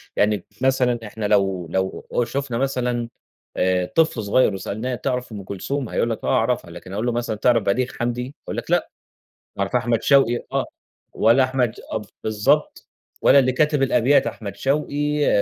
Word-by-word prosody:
يعني 105 Hz, -2 st, +1 dB, 0.2 s
مثلًا 125 Hz, -2 st, +2 dB
إحنا 110 Hz, 0 st, -5 dB
لو 95 Hz, -4 st, +1 dB
لو 95 Hz, +1 st, -2 dB, 0.2 s
شفنا 135 Hz, -2 st, -3 dB
مثلًا 125 Hz, -2 st, -1 dB, 0.5 s
آآ، 90 Hz, 0 st, +2 dB
طفل 130 Hz, -, +1 dB
صغيّر 105 Hz, +1 st, +3 dB
وسألناه 110 Hz, +6 st, -3 dB
تعرف 125 Hz, -1 st, -3 dB
أم 105 Hz, -2 st, -7 dB
كلثوم؟ 115 Hz, +7 st, -4 dB
هيقول 115 Hz, -, 0 dB
لك 115 Hz, -, -4 dB
آه -, -, -3 dB
أعرفها، 115 Hz, -6 st, 0 dB
لكن 90 Hz, +2 st, -10 dB
أقول 105 Hz, +4 st, -2 dB
له 120 Hz, -, +1 dB
مثلًا 120 Hz, -2 st, -2 dB
تعرف 115 Hz, +1 st, +3 dB
بليغ 120 Hz, +6 st, +1 dB
حمدي؟ 120 Hz, +1 st, -1 dB, 0.2 s
هيقول -, -, -6 dB
لك -, -, -5 dB
لأ. -, -, +2 dB, 0.7 s
تعرف 100 Hz, +4 st, -1 dB
أحمد 120 Hz, -2 st, +1 dB
شوقي؟ 135 Hz, -4 st, +3 dB
آه -, -, +1 dB, 0.5 s
ولا 115 Hz, +5 st, +4 dB
أحمد 130 Hz, -3 st, 0 dB
أ 110 Hz, -, -2 dB, 0.2 s
بالضبط 110 Hz, -1 st, +1 dB, 0.3 s
ولا 140 Hz, -, +7 dB
اللي 130 Hz, -1 st, +3 dB
كاتب 150 Hz, +2 st, +2 dB
الأبيات 135 Hz, +1 st, +3 dB
أحمد 100 Hz, -3 st, -6 dB
شوقي، 145 Hz, +3 st, 0 dB
120 Hz, 165 wpm, -22 LUFS, 105-130 Hz, 0.7 s, ولا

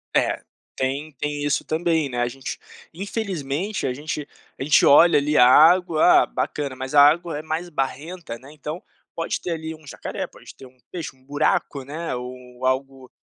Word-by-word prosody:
É, -, -, +1 dB, 0.3 s
tem 140 Hz, +4 st, -2 dB
tem 145 Hz, +2 st, -3 dB
isso 145 Hz, -1 st, 0 dB
também, 160 Hz, -2 st, 0 dB
né, 125 Hz, -2 st, -4 dB
a 120 Hz, -, +1 dB
gente 130 Hz, +2 st, -6 dB, 0.3 s
infelizmente 190 Hz, -3 st, -3 dB
a 125 Hz, -, -1 dB
gente 150 Hz, +1 st, -5 dB, 0.3 s
a -, -, -2 dB
gente 145 Hz, -, +5 dB
olha 165 Hz, +4 st, +7 dB
ali 150 Hz, +1 st, +1 dB
a 125 Hz, -, +8 dB
água, 165 Hz, +4 st, +6 dB
ah, -, -, -2 dB
bacana, 140 Hz, -3 st, -3 dB
mas 130 Hz, +1 st, -6 dB
a 145 Hz, -, +8 dB
água 160 Hz, +1 st, +4 dB
é -, -, -5 dB
mais 160 Hz, +3 st, -3 dB
barrenta, 150 Hz, 0 st, -4 dB
né, 130 Hz, +4 st, -15 dB
então 155 Hz, +3 st, -6 dB, 0.3 s
pode 165 Hz, -, -2 dB
ter 175 Hz, -, -4 dB
ali 160 Hz, -1 st, -4 dB
um 155 Hz, -1 st, -15 dB
jacaré, -, -, -5 dB
pode -, -, -15 dB
ter 135 Hz, -, -13 dB
um 130 Hz, -, -23 dB
peixe, 165 Hz, -6 st, -6 dB
um 130 Hz, -, -27 dB
buraco, 145 Hz, -1 st, 0 dB
né, 150 Hz, 0 st, -4 dB
ou 125 Hz, 0 st, -9 dB
algo 130 Hz, 0 st, -2 dB
145 Hz, 185 wpm, -23 LUFS, 130-160 Hz, 0.3 s, a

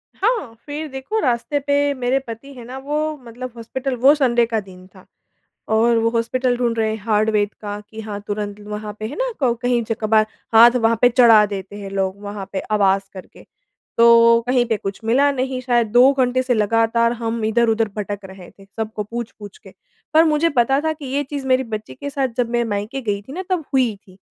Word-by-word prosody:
हाँ, 420 Hz, -, -1 dB
फ़िर 300 Hz, +2 st, -5 dB
देखो 270 Hz, +12 st, -3 dB
रास्ते 255 Hz, -, 0 dB
पे 285 Hz, 0 st, +1 dB
मेरे 255 Hz, +1 st, 0 dB
पति 230 Hz, +5 st, -9 dB
है 250 Hz, -3 st, -11 dB
ना 255 Hz, +2 st, -8 dB
वो 300 Hz, +3 st, -2 dB
मतलब 245 Hz, +2 st, -8 dB
हॉस्पिटल 250 Hz, +3 st, -4 dB
वो 280 Hz, +2 st, +8 dB
संडे 240 Hz, -5 st, +2 dB
का 225 Hz, -1 st, -1 dB
दिन 185 Hz, -2 st, -13 dB
था 185 Hz, -, -16 dB, 0.7 s
और 230 Hz, +1 st, +3 dB
वो 225 Hz, 0 st, +2 dB
हॉस्पिटल 245 Hz, +2 st, 0 dB
ढूँढ 235 Hz, -2 st, -1 dB
रहे 220 Hz, -1 st, +1 dB
हैं 220 Hz, -, -3 dB
हाड़वैद्य 215 Hz, -1 st, +1 dB
का 205 Hz, 0 st, -5 dB
कि 220 Hz, 0 st, -8 dB
हाँ 210 Hz, -2 st, -6 dB
तुरंत 205 Hz, 0 st, -4 dB
ल -, -, -13 dB
वहाँ 210 Hz, 0 st, -5 dB
पे 215 Hz, -, -4 dB
है 285 Hz, -, -7 dB
ना -, -, -1 dB
को 255 Hz, -4 st, +2 dB
कहीं 245 Hz, -1 st, +1 dB
ज 225 Hz, -, 0 dB
कभार 215 Hz, 0 st, +3 dB, 0.3 s
हाथ 235 Hz, +2 st, +8 dB
वहाँ 230 Hz, -1 st, +2 dB
पे 245 Hz, -, +6 dB
चढ़ा 230 Hz, -4 st, +6 dB
देते 200 Hz, -1 st, -7 dB
हैं 200 Hz, -1 st, -7 dB
लोग 195 Hz, 0 st, -2 dB
वहाँ 200 Hz, -1 st, -6 dB
पे 190 Hz, -, -1 dB
आवाज़ 195 Hz, -2 st, +3 dB
करके। 185 Hz, -2 st, -12 dB, 0.5 s
तो 230 Hz, 0 st, +6 dB
कहीं 250 Hz, -1 st, +2 dB
पे 225 Hz, -2 st, -1 dB
कुछ 195 Hz, -1 st, -6 dB
मिला 275 Hz, +5 st, +3 dB
नहीं 260 Hz, -1 st, -2 dB
शायद 240 Hz, -3 st, +1 dB
2 250 Hz, +4 st, +6 dB
घंटे 255 Hz, -1 st, +1 dB
से 255 Hz, -, +1 dB
लगातार 225 Hz, +2 st, +2 dB
हम 230 Hz, -1 st, -3 dB
इधर-उधर 225 Hz, 0 st, +2 dB
भटक 205 Hz, 0 st, -4 dB
रहे 190 Hz, -2 st, -12 dB
थे 195 Hz, -, -18 dB
सबको 220 Hz, -1 st, -3 dB
पूछ-पूछ 215 Hz, -2 st, -8 dB
के। -, -, -16 dB, 0.4 s
पर 320 Hz, +1 st, +7 dB
मुझे 315 Hz, +1 st, +2 dB
पता 270 Hz, +3 st, +3 dB
था 315 Hz, -, 0 dB
कि 300 Hz, -2 st, -11 dB
ये 275 Hz, +2 st, -1 dB
चीज़ 280 Hz, -1 st, -6 dB
मेरी 260 Hz, 0 st, +3 dB
बच्ची 215 Hz, -, -6 dB
के 285 Hz, -, -6 dB
साथ 275 Hz, -2 st, -1 dB
जब 240 Hz, -2 st, 0 dB
मैं 240 Hz, 0 st, +1 dB
मायके 210 Hz, +5 st, -3 dB
गई 205 Hz, -4 st, -2 dB
थी 265 Hz, +7 st, -11 dB
ना 375 Hz, +2 st, -4 dB
तब 360 Hz, -3 st, 0 dB
हुई 250 Hz, -5 st, +2 dB
थी, 195 Hz, -2 st, -21 dB
235 Hz, 215 wpm, -20 LUFS, 210-265 Hz, 0.7 s, वो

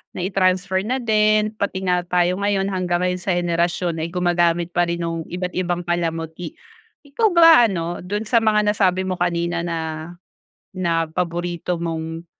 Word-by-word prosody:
nai-transfer 185 Hz, 0 st, +1 dB
na 255 Hz, 0 st, -1 dB
din 215 Hz, -1 st, +3 dB
pati 200 Hz, -3 st, -3 dB
nga 180 Hz, -1 st, +2 dB
tayo 180 Hz, +1 st, +1 dB
ngayon 200 Hz, -1 st, 0 dB
hanggang 180 Hz, -2 st, -1 dB
ngayon 180 Hz, 0 st, 0 dB
sa 180 Hz, 0 st, -1 dB
henerasyon 170 Hz, -1 st, -1 dB
ay 160 Hz, -, -2 dB
gumagamit 175 Hz, -1 st, +1 dB
pa 175 Hz, 0 st, +1 dB
rin 170 Hz, 0 st, -2 dB
nung 165 Hz, -1 st, -4 dB
iba't 180 Hz, +1 st, -4 dB
ibang 175 Hz, -1 st, -2 dB
palamuti. 170 Hz, -, -3 dB, 0.5 s
Ikaw 290 Hz, +11 st, +1 dB
ba 330 Hz, -8 st, +8 dB
ano, 175 Hz, -3 st, -3 dB
do'n 205 Hz, +4 st, -3 dB
sa 230 Hz, +2 st, +3 dB
mga 210 Hz, -1 st, +2 dB
nasabi 190 Hz, -3 st, +1 dB
mo 185 Hz, -1 st, -3 dB
kanina 170 Hz, 0 st, 0 dB
na 170 Hz, -1 st, -3 dB, 1.0 s
na 165 Hz, -3 st, 0 dB
paborito 175 Hz, 0 st, -3 dB
mong 165 Hz, 0 st, -4 dB
180 Hz, 155 wpm, -21 LUFS, 170-195 Hz, 1.0 s, ba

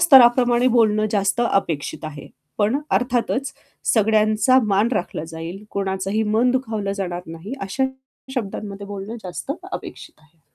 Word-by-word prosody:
स्तराप्रमाणे 245 Hz, -5 st, +6 dB
बोलणं 215 Hz, -3 st, +3 dB
जास्त 200 Hz, +3 st, +1 dB
अपेक्षित 160 Hz, -6 st, -1 dB
आहे. 155 Hz, -2 st, -7 dB, 0.3 s
पण 215 Hz, +7 st, +2 dB
अर्थातच 250 Hz, +2 st, 0 dB, 0.4 s
सगळ्यांचा 215 Hz, +3 st, +4 dB
मान 205 Hz, +2 st, +2 dB
राखला 180 Hz, -6 st, -2 dB
जाईल, 165 Hz, +5 st, -7 dB
कोणाचंही 195 Hz, +2 st, -1 dB
मन 220 Hz, +4 st, +2 dB
दुखावलं 220 Hz, -6 st, -1 dB
जाणार 180 Hz, -3 st, -3 dB
नाही 165 Hz, +8 st, -8 dB
अशा 195 Hz, +8 st, -1 dB, 0.5 s
शब्दांमध्ये 200 Hz, -3 st, -4 dB
बोलणं 200 Hz, +3 st, -6 dB
जास्त 180 Hz, +10 st, -4 dB, 0.2 s
अपेक्षित -, -, -7 dB
आहे. 160 Hz, +1 st, -28 dB
210 Hz, 125 wpm, -22 LUFS, 195-240 Hz, 0.5 s, स्तराप्रमाणे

